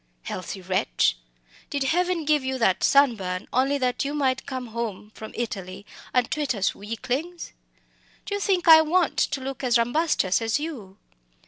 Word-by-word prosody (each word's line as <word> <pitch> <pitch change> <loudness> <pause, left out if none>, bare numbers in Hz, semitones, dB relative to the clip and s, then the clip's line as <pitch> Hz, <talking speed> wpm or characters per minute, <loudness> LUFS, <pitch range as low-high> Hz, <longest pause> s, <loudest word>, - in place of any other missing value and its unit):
"Healthy 185 +1 -6
wretch! 180 - +1 0.5
Did 285 -1 -1
Heaven 350 +3 0
give 300 -2 +2
you 260 0 -2
that 210 -7 +2
sun 275 -3 +5
burn 185 -2 -5
only 270 +3 +2
that 250 -2 0
you 285 +1 -3
might 265 -3 0
come 255 -3 -5
home 220 -3 -5
from 220 - -9
Italy 200 -4 -5 0.3
and 250 -1 +2
twit 295 -5 -1
us 195 -2 0
weaklings? 255 - -5 0.7
Do - - -5
you 405 - -1
think 375 -4 +1
I 320 -1 +10
want 335 +2 +1
to 270 - 0
look 270 +1 -6
as 245 -2 +3
rombustious 240 - +1
as 225 +4 0
you? 245 -12 -7
255 Hz, 165 wpm, -25 LUFS, 215-300 Hz, 0.7 s, I